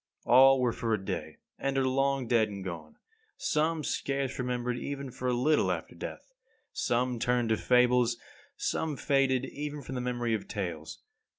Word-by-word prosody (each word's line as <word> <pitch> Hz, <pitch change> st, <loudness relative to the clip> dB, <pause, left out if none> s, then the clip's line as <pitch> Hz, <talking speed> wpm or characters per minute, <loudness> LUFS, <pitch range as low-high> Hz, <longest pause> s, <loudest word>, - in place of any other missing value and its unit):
All 135 Hz, +2 st, +7 dB
were 125 Hz, -2 st, +1 dB
for 115 Hz, -2 st, 0 dB
a 95 Hz, -2 st, -8 dB
day, 95 Hz, -2 st, -4 dB, 0.2 s
and 135 Hz, 0 st, -1 dB
are 135 Hz, -1 st, +2 dB
long 135 Hz, 0 st, +1 dB
dead 115 Hz, -2 st, +3 dB
and 100 Hz, -2 st, -7 dB
gone; 85 Hz, -4 st, -7 dB, 0.4 s
some 155 Hz, +1 st, 0 dB
scarce 135 Hz, -2 st, -2 dB
remembered 125 Hz, -1 st, -2 dB
even 140 Hz, -2 st, -5 dB
for 125 Hz, -, -4 dB
a 125 Hz, -, +2 dB
little 145 Hz, +5 st, +2 dB
after -, -, -4 dB
death; -, -, -8 dB, 0.4 s
some 125 Hz, 0 st, 0 dB
turned 120 Hz, -1 st, +1 dB
to 110 Hz, -, +2 dB
fables; 125 Hz, -1 st, +3 dB, 0.4 s
some 155 Hz, -3 st, -1 dB
faded 135 Hz, -2 st, +2 dB
even 145 Hz, 0 st, -6 dB
from 130 Hz, -, -7 dB
the 125 Hz, -, -2 dB
memory 120 Hz, -2 st, -1 dB
of 105 Hz, -3 st, -2 dB
tales. 85 Hz, -6 st, -5 dB
125 Hz, 170 wpm, -30 LUFS, 115-135 Hz, 0.4 s, All